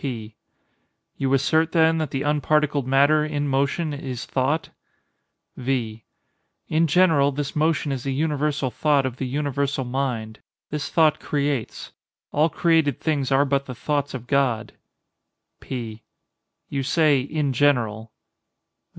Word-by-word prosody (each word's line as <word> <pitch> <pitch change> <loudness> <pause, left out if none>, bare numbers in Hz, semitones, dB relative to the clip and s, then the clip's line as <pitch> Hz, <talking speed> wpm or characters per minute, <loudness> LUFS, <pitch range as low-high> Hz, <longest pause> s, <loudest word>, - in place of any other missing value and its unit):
P. 115 -5 -5 0.8
You 135 -1 -1
assert, 160 +4 +1
then, 160 -1 +4
that 155 -3 -2
the 135 +1 -3
unparticled 150 -1 +1
matter, 140 +3 +4
in 145 -1 -2
motion, 140 +4 0
is 130 -3 -5
thought? 140 +5 -1 0.9
V. 120 -4 -3 0.6
In 165 +2 +2
general, 155 -4 +4
this 145 0 -4
motion 155 -1 +1
is 135 -2 -3
the 135 - -3
universal 150 -1 -1
thought 145 +2 +2
of 130 -1 -4
the 130 - -3
universal 140 0 -1
mind. 125 -4 -3 0.3
This 150 0 -3
thought 155 -2 +3
creates. 140 -5 -2 0.4
All 155 +3 +2
created 160 -4 +2
things 145 -4 -1
are 135 +1 +4
but 140 0 0
the 125 - -6
thoughts 145 +1 -2
of 125 -2 -7
God. 130 -5 0 0.9
P. 115 -4 -6 0.7
You 140 - -2
say, 150 +1 +3
"in 145 0 -2
general." 115 -5 +1
140 Hz, 135 wpm, -23 LUFS, 130-150 Hz, 0.9 s, then